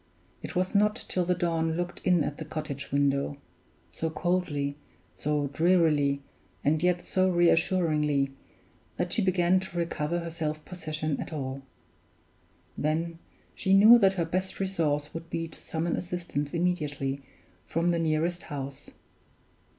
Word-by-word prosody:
It -, -, -7 dB
was 180 Hz, +1 st, 0 dB
not 210 Hz, +2 st, +2 dB
till 180 Hz, -1 st, 0 dB
the 180 Hz, +1 st, +2 dB
dawn 165 Hz, -2 st, 0 dB
looked 175 Hz, 0 st, -3 dB
in 180 Hz, -4 st, +4 dB
at 145 Hz, -, -3 dB
the -, -, -5 dB
cottage 150 Hz, -2 st, -5 dB
window 140 Hz, 0 st, +1 dB, 0.5 s
so 160 Hz, -, -2 dB
coldly, 160 Hz, -5 st, -1 dB, 0.4 s
so 150 Hz, 0 st, -1 dB
drearily, 155 Hz, -5 st, +3 dB, 0.4 s
and 155 Hz, +2 st, +2 dB
yet 180 Hz, 0 st, +1 dB
so 185 Hz, 0 st, +2 dB
re 175 Hz, -1 st, +4 dB
assuringly 150 Hz, -5 st, +2 dB, 0.7 s
that -, -, -1 dB
she 225 Hz, -, +2 dB
began 185 Hz, -1 st, +3 dB
to 185 Hz, -2 st, -7 dB
recover 170 Hz, -1 st, -1 dB
her 170 Hz, -1 st, -4 dB
self 155 Hz, -2 st, -3 dB
possession 155 Hz, -4 st, -3 dB
at -, -, -6 dB
all. 135 Hz, -3 st, -4 dB, 1.1 s
Then 165 Hz, +2 st, -1 dB, 0.3 s
she 190 Hz, 0 st, +2 dB
knew 220 Hz, +4 st, +9 dB
that 195 Hz, -3 st, +5 dB
her 175 Hz, -3 st, 0 dB
best 185 Hz, +3 st, -2 dB
resource 155 Hz, -6 st, 0 dB
would 165 Hz, 0 st, -7 dB
be 165 Hz, 0 st, -2 dB
to 160 Hz, -, -11 dB
summon 165 Hz, +1 st, -2 dB
assistance 175 Hz, -4 st, -3 dB
immediately 145 Hz, -6 st, -1 dB, 0.5 s
from 170 Hz, +2 st, +1 dB
the 170 Hz, -, +1 dB
nearest 165 Hz, +2 st, 0 dB
house. 140 Hz, -3 st, -7 dB
165 Hz, 145 wpm, -28 LUFS, 150-180 Hz, 1.1 s, knew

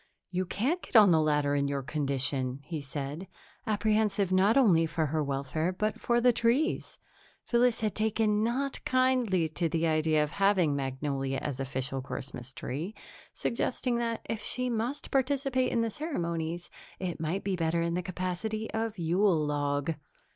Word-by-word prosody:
"You 185 Hz, 0 st, -1 dB
can't 280 Hz, -, 0 dB
get -, -, -13 dB
on 210 Hz, -4 st, +8 dB
the 160 Hz, -1 st, +5 dB
ladder 150 Hz, -2 st, +2 dB
in 140 Hz, -1 st, +1 dB
your 140 Hz, -1 st, -2 dB
condition," 135 Hz, -2 st, -1 dB
he 160 Hz, -2 st, -5 dB
said, 140 Hz, +5 st, -5 dB, 0.4 s
apprehensive 210 Hz, -2 st, +1 dB
not 195 Hz, +6 st, +4 dB
only 175 Hz, -11 st, +5 dB
for 160 Hz, 0 st, 0 dB
her 155 Hz, +1 st, 0 dB
welfare 140 Hz, +5 st, -1 dB
but 215 Hz, +3 st, -2 dB
for 240 Hz, 0 st, +2 dB
the 245 Hz, 0 st, +5 dB
tree's. 245 Hz, +9 st, +1 dB, 0.5 s
Phyllis 240 Hz, -1 st, +2 dB
had 215 Hz, -1 st, +1 dB
not -, -, -30 dB
taken 220 Hz, +4 st, +1 dB
kindly 255 Hz, -9 st, +2 dB
to 165 Hz, +2 st, -1 dB
the 165 Hz, +1 st, 0 dB
idea 155 Hz, -1 st, +2 dB
of 150 Hz, -, -4 dB
having 195 Hz, -7 st, +3 dB
Magnolia 135 Hz, 0 st, -2 dB
as 140 Hz, -3 st, -4 dB
official 135 Hz, 0 st, -2 dB
Christmas 130 Hz, -1 st, -7 dB
tree, 155 Hz, -, -5 dB, 0.4 s
suggesting 245 Hz, +1 st, -1 dB
that, 230 Hz, -1 st, -2 dB
if 225 Hz, -1 st, -3 dB
she 250 Hz, +3 st, -1 dB
must 235 Hz, +5 st, -3 dB
participate 270 Hz, -1 st, +1 dB
in 235 Hz, -, +1 dB
the 230 Hz, -1 st, 0 dB
ceremonies, 170 Hz, -, -3 dB, 0.3 s
it 180 Hz, -3 st, -4 dB
might 165 Hz, +5 st, -2 dB
be 195 Hz, -1 st, 0 dB
better 165 Hz, 0 st, 0 dB
in 170 Hz, 0 st, -1 dB
the 180 Hz, -, 0 dB
capacity 185 Hz, +5 st, -3 dB
of 225 Hz, -1 st, -2 dB
Yule 170 Hz, -1 st, +2 dB
log. 145 Hz, +1 st, 0 dB
180 Hz, 160 wpm, -29 LUFS, 150-225 Hz, 0.5 s, on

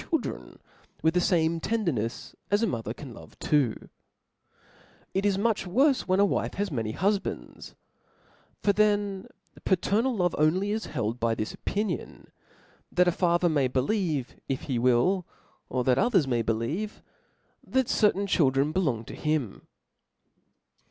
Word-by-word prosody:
children 325 Hz, -, -3 dB, 0.5 s
with 160 Hz, 0 st, +3 dB
the 180 Hz, -, +2 dB
fame 165 Hz, -2 st, +2 dB
tende^nefs 155 Hz, -, -2 dB, 0.2 s
ds 205 Hz, +3 st, +2 dB
a -, -, +5 dB
mother 115 Hz, -, -3 dB
can 130 Hz, +1 st, -8 dB
Jove -, -, -14 dB
twa 140 Hz, -7 st, +2 dB, 1.4 s
It 195 Hz, +2 st, +1 dB
is 195 Hz, -2 st, +1 dB
much 215 Hz, 0 st, 0 dB
worfe 265 Hz, +8 st, +2 dB
when 185 Hz, +1 st, +2 dB
a 200 Hz, -, +6 dB
wife -, -, -1 dB
has 200 Hz, -2 st, -2 dB
many 110 Hz, -5 st, -2 dB
hitrifbands; 200 Hz, -, -2 dB, 0.9 s
for 200 Hz, -, +4 dB
then 205 Hz, -2 st, +1 dB, 0.4 s
:paternal 215 Hz, +7 st, +1 dB
love 175 Hz, -2 st, +1 dB
is -, -, -5 dB
only 185 Hz, +6 st, +2 dB
held 120 Hz, -, -3 dB
by 115 Hz, -1 st, +1 dB
this 110 Hz, -, -3 dB
opinion, 210 Hz, +1 st, -4 dB, 0.6 s
that 180 Hz, 0 st, +3 dB
a -, -, +5 dB
father 175 Hz, 0 st, +2 dB
may 145 Hz, -6 st, +2 dB
beli^vei 150 Hz, -, 0 dB, 0.2 s
if 135 Hz, -, -1 dB
he 130 Hz, -4 st, -1 dB
Will, 130 Hz, +10 st, +2 dB, 0.4 s
of 125 Hz, -1 st, -1 dB
that 130 Hz, 0 st, +3 dB
others 190 Hz, -, +3 dB
,may 120 Hz, -3 st, +1 dB
believe^ 115 Hz, -, -2 dB, 0.7 s
thut^certahi 210 Hz, -6 st, +2 dB
K:hildren 140 Hz, -3 st, +2 dB
belong 135 Hz, -12 st, 0 dB
*to -, -, -9 dB
him. 150 Hz, -9 st, -2 dB
170 Hz, 140 wpm, -27 LUFS, 130-200 Hz, 1.4 s, a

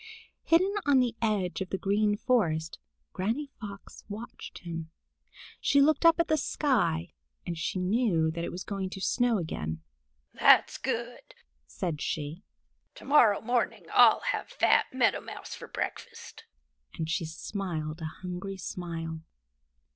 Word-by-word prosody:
Hidden 370 Hz, +4 st, +4 dB
on 280 Hz, -2 st, +6 dB
the 245 Hz, -2 st, +1 dB
edge 200 Hz, -5 st, 0 dB
of 190 Hz, -, -3 dB
the 190 Hz, -, -1 dB
Green 205 Hz, +2 st, +1 dB
Forest, 165 Hz, -11 st, 0 dB, 0.3 s
Granny 230 Hz, +10 st, -2 dB
Fox 200 Hz, -2 st, -9 dB
watched 215 Hz, +3 st, -8 dB
him. 165 Hz, -2 st, -5 dB, 0.7 s
She 280 Hz, -, +3 dB
looked 310 Hz, +4 st, +5 dB
up 330 Hz, 0 st, +5 dB
at 335 Hz, -, +3 dB
the 315 Hz, -, +2 dB
sky, 250 Hz, -, 0 dB, 0.3 s
and 170 Hz, -, -3 dB
she 165 Hz, +3 st, -2 dB
knew 180 Hz, -4 st, +2 dB
that 170 Hz, +1 st, -4 dB
it -, -, -3 dB
was 180 Hz, -, -6 dB
going 195 Hz, -2 st, -3 dB
to 190 Hz, -, -7 dB
snow 240 Hz, +3 st, +2 dB
again. 80 Hz, -, -4 dB, 0.5 s
"That's -, -, +5 dB
good," -, -, -4 dB, 0.3 s
said 155 Hz, -, -4 dB
she. 155 Hz, +4 st, -3 dB, 0.5 s
"To -, -, -12 dB
morrow 250 Hz, -8 st, +5 dB
morning 240 Hz, 0 st, -1 dB
I'll -, -, +7 dB
have -, -, -2 dB
fat -, -, +3 dB
Meadow -, -, +2 dB
Mouse -, -, -8 dB
for -, -, -9 dB
breakfast," -, -, -6 dB, 0.5 s
and 160 Hz, -, -2 dB
she 165 Hz, +2 st, -1 dB
smiled 160 Hz, -2 st, -4 dB
a -, -, -3 dB, 0.2 s
hungry 185 Hz, +2 st, -5 dB
smile. 165 Hz, -3 st, -5 dB
190 Hz, 145 wpm, -29 LUFS, 165-235 Hz, 0.7 s, I'll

